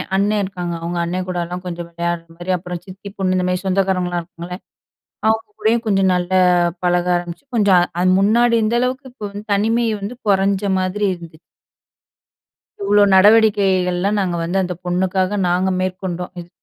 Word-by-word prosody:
அண்ணன் 205 Hz, +2 st, +2 dB
இருக்காங்க. 180 Hz, -3 st, -4 dB
அவங்க 175 Hz, +1 st, -3 dB
அண்ணன் 180 Hz, +2 st, -3 dB
கூடலாம் 180 Hz, 0 st, -4 dB
கொஞ்சம் 175 Hz, -1 st, -5 dB
விளையாடுற 170 Hz, 0 st, -3 dB
மாதிரி 175 Hz, +1 st, -4 dB
அப்புறம், 180 Hz, -1 st, -7 dB
சித்தி 195 Hz, +1 st, -10 dB
பொண்ணு 185 Hz, -1 st, 0 dB
இந்தமாதிரி 180 Hz, 0 st, -1 dB
சொந்தக்காரங்கலா 185 Hz, -2 st, 0 dB
இருக்காங்களே 170 Hz, +1 st, -9 dB, 0.7 s
அவங்க 220 Hz, 0 st, +1 dB
கூடயும் 230 Hz, +2 st, +1 dB
கொஞ்சம் 195 Hz, -2 st, +3 dB
நல்ல 180 Hz, +1 st, -2 dB, 0.5 s
பழக 175 Hz, 0 st, +2 dB
ஆரம்பிச்சு, 175 Hz, +7 st, -5 dB
கொஞ்சம் 200 Hz, -5 st, +5 dB, 0.2 s
அது 185 Hz, -, +3 dB
முன்னாடி 235 Hz, +4 st, +3 dB
இருந்த 220 Hz, +2 st, +1 dB
அளவுக்கு 255 Hz, +1 st, -2 dB
இப்போ 230 Hz, -4 st, -12 dB
வந்து 205 Hz, +1 st, -8 dB
தனிமை 225 Hz, +4 st, +1 dB, 0.2 s
வந்து 205 Hz, +5 st, -5 dB
குறஞ்ச 195 Hz, 0 st, +2 dB, 0.2 s
மாதிரி 185 Hz, +3 st, -1 dB
இருந்துச்சு. 170 Hz, -3 st, -11 dB, 1.4 s
இவ்வளோ, 205 Hz, +1 st, +4 dB
நடவடிக்கைகள்ல 195 Hz, -3 st, +4 dB
நாங்க 180 Hz, -3 st, -1 dB
வந்து 175 Hz, +3 st, -1 dB
அந்த 180 Hz, 0 st, -3 dB
பொண்ணுக்காக 185 Hz, +2 st, 0 dB
நாங்க 185 Hz, +2 st, +1 dB
மேற்கொண்டோம். 185 Hz, -1 st, -4 dB
இது 175 Hz, 0 st, -10 dB
185 Hz, 150 wpm, -19 LUFS, 175-205 Hz, 1.4 s, கொஞ்சம்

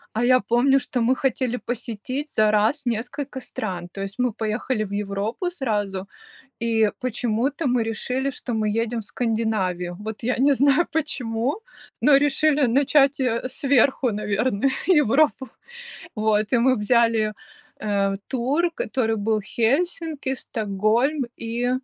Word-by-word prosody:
А 225 Hz, -, +1 dB
я 255 Hz, +1 st, +5 dB
помню, 250 Hz, +5 st, +3 dB
что 250 Hz, -, -3 dB
мы 240 Hz, +3 st, +3 dB
хотели 255 Hz, -2 st, -1 dB
посетить 250 Hz, +4 st, -5 dB
за 215 Hz, -1 st, +4 dB
раз 220 Hz, +8 st, +2 dB
несколько 250 Hz, +4 st, -3 dB
стран. 185 Hz, -8 st, -5 dB
То 195 Hz, -, -8 dB
есть 195 Hz, +2 st, -6 dB
мы 250 Hz, -1 st, +1 dB
поехали 220 Hz, +2 st, -2 dB
в 200 Hz, -, -9 dB
Европу 205 Hz, -, -2 dB
сразу, 205 Hz, -, -3 dB, 0.5 s
и 225 Hz, -2 st, +2 dB
почему-то 250 Hz, +4 st, -1 dB
мы 245 Hz, -3 st, +2 dB
решили, 250 Hz, +4 st, -2 dB
что 250 Hz, -1 st, -6 dB
мы 215 Hz, -1 st, 0 dB
едем 230 Hz, +2 st, -1 dB
в -, -, -6 dB
Скандинавию. 205 Hz, -7 st, -2 dB
Вот 215 Hz, +1 st, -6 dB
я 250 Hz, +2 st, +1 dB
не 280 Hz, +3 st, +4 dB
знаю 280 Hz, +5 st, +3 dB
почему, 275 Hz, -, -1 dB, 0.4 s
но 290 Hz, -2 st, +6 dB
решили 290 Hz, 0 st, +2 dB
начать, 275 Hz, +3 st, +3 dB
э, 250 Hz, -1 st, 0 dB
сверху, 265 Hz, -1 st, +2 dB
наверное, 210 Hz, +4 st, 0 dB, 0.2 s
Европу. 295 Hz, -, +3 dB, 0.7 s
Вот, 215 Hz, 0 st, +1 dB
и 245 Hz, -, +4 dB
мы 255 Hz, +2 st, +4 dB
взяли, 225 Hz, 0 st, +2 dB, 0.5 s
э, 200 Hz, -2 st, 0 dB
тур, 280 Hz, +7 st, 0 dB
который 225 Hz, -4 st, -1 dB
был 215 Hz, +1 st, 0 dB
в -, -, -15 dB
Хельсинки, 290 Hz, -, -1 dB
Стокгольм, 225 Hz, +6 st, 0 dB
и 235 Hz, +2 st, -1 dB
240 Hz, 140 wpm, -23 LUFS, 215-270 Hz, 0.7 s, но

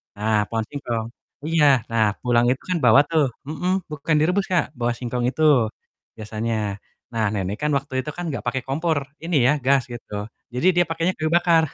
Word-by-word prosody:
Nah, 105 Hz, +1 st, +1 dB
pohon 115 Hz, -1 st, -1 dB
singkong. 120 Hz, -6 st, -3 dB, 0.4 s
Iya, 165 Hz, -2 st, +3 dB, 0.3 s
nah 110 Hz, -1 st, +3 dB, 0.2 s
pulang 120 Hz, -1 st, +3 dB
itu 130 Hz, -, -2 dB
kan 180 Hz, -, +1 dB
bawa 140 Hz, -, +7 dB
tuh 160 Hz, -2 st, +3 dB, 0.2 s
mhm, 180 Hz, +4 st, -2 dB, 0.2 s
bukan 150 Hz, +1 st, -1 dB
direbus 180 Hz, +5 st, +2 dB
Kak, 175 Hz, -, +3 dB
bawa 120 Hz, 0 st, +1 dB
singkong 125 Hz, 0 st, -3 dB
itu 155 Hz, -, -5 dB, 0.8 s
biasanya. 110 Hz, +1 st, -3 dB, 0.6 s
Nah 110 Hz, -1 st, +1 dB
nenek 100 Hz, +1 st, -2 dB
kan 150 Hz, -, +1 dB
waktu 140 Hz, -1 st, -7 dB
itu 150 Hz, -, -7 dB
kan 175 Hz, -, -4 dB
gak 125 Hz, -, -3 dB
pakai 130 Hz, +1 st, -1 dB
kompor 160 Hz, +3 st, 0 dB, 0.3 s
ini 170 Hz, -1 st, -1 dB
ya, -, -, +5 dB
gas 135 Hz, -1 st, +4 dB
gitu, 115 Hz, -3 st, -10 dB, 0.4 s
jadi 130 Hz, +9 st, +1 dB
dia 175 Hz, -, +5 dB
pakainya 165 Hz, +3 st, 0 dB
kayu 155 Hz, 0 st, -1 dB
bakar. 170 Hz, -2 st, +4 dB
140 Hz, 185 wpm, -23 LUFS, 115-165 Hz, 0.8 s, bawa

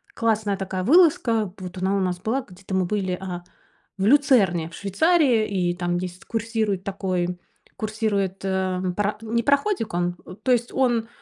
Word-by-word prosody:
классная 215 Hz, -3 st, +1 dB
такая 190 Hz, -1 st, -3 dB
вылазка. 260 Hz, -, +4 dB
Вот 185 Hz, 0 st, -7 dB
она 190 Hz, +2 st, 0 dB
у -, -, 0 dB
нас 180 Hz, -1 st, -1 dB
была, 235 Hz, +8 st, -1 dB
где-то 190 Hz, -1 st, -11 dB
мы 190 Hz, -, +2 dB
были, 190 Hz, -1 st, -1 dB
э, 180 Hz, -1 st, -6 dB, 0.6 s
в 195 Hz, -, 0 dB
Люцерне 220 Hz, -, +4 dB
в -, -, -14 dB
Швейцарии, 240 Hz, -, +3 dB
и 180 Hz, -3 st, 0 dB
там 175 Hz, 0 st, -1 dB
есть, 180 Hz, 0 st, -6 dB
курсирует 220 Hz, -4 st, -1 dB
такой, 180 Hz, -2 st, -2 dB, 0.4 s
курсирует, 210 Hz, -3 st, -2 dB
эм, 185 Hz, -1 st, -1 dB
пара 205 Hz, +2 st, 0 dB
не 230 Hz, +1 st, 0 dB
пароходик 280 Hz, -, +1 dB
он, 175 Hz, 0 st, 0 dB
э, 180 Hz, -, -9 dB
то 255 Hz, -, +2 dB
есть 240 Hz, 0 st, +1 dB
он- 240 Hz, -4 st, +1 dB
200 Hz, 165 wpm, -24 LUFS, 185-230 Hz, 0.6 s, вылазка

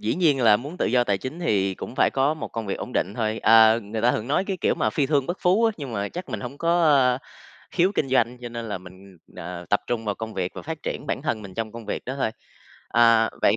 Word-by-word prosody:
dĩ 110 Hz, -, -1 dB
nhiên 155 Hz, -7 st, +2 dB
là 105 Hz, -2 st, +6 dB
muốn 145 Hz, +9 st, -8 dB
tự -, -, 0 dB
do 125 Hz, -1 st, +3 dB
tài 100 Hz, -4 st, 0 dB
chính 130 Hz, -, -6 dB
thì 100 Hz, -, +1 dB
cũng -, -, -8 dB
phải -, -, +3 dB
có 140 Hz, +3 st, +1 dB
một 155 Hz, -, -6 dB
công 115 Hz, -2 st, -5 dB
việc 100 Hz, -, -1 dB
ổn -, -, -6 dB
định 100 Hz, +3 st, -1 dB
thôi. 110 Hz, -2 st, -1 dB
Ờ, 110 Hz, 0 st, +6 dB
người 110 Hz, +1 st, -5 dB
ta 120 Hz, -, +4 dB
thường 110 Hz, +4 st, -3 dB
nói 155 Hz, +6 st, +1 dB
cái, 195 Hz, -2 st, -3 dB
kiểu, -, -, +2 dB
mà -, -, 0 dB
"phi 140 Hz, -3 st, 0 dB
thương 140 Hz, -2 st, +1 dB
bất 175 Hz, -, -2 dB
phú" 195 Hz, +6 st, +3 dB
á, 225 Hz, -, +4 dB
nhưng 140 Hz, -6 st, -6 dB
mà 100 Hz, -1 st, -2 dB
chắc 180 Hz, +2 st, -7 dB
mình -, -, -4 dB
hổng 130 Hz, +3 st, -7 dB
có, 170 Hz, +1 st, +2 dB
ơ, 135 Hz, -5 st, +4 dB, 0.5 s
khiếu 185 Hz, +3 st, +2 dB
kinh 135 Hz, -, -1 dB
doanh, 125 Hz, -1 st, +1 dB
cho 120 Hz, -, -6 dB
nên 115 Hz, 0 st, -6 dB
là 100 Hz, -, -3 dB
mình, 95 Hz, +1 st, -15 dB, 0.2 s
ờ, 85 Hz, 0 st, -7 dB
tập 105 Hz, -, +3 dB
trung 115 Hz, -2 st, -2 dB
vào 105 Hz, -2 st, -1 dB
công 110 Hz, -1 st, -7 dB
việc 90 Hz, -1 st, -2 dB
và -, -, -7 dB
phát 160 Hz, 0 st, -6 dB
triển 145 Hz, -, -4 dB
bản -, -, -2 dB
thân 115 Hz, -8 st, -2 dB
mình 95 Hz, -2 st, -10 dB
trong 110 Hz, 0 st, -4 dB
công 115 Hz, -2 st, -9 dB
việc -, -, -4 dB
đó 130 Hz, -, -4 dB
thôi. 110 Hz, -, 0 dB, 0.6 s
Ờ, 115 Hz, -2 st, +4 dB
vậy, 105 Hz, -, +4 dB
120 Hz, 285 wpm, -24 LUFS, 105-145 Hz, 0.6 s, là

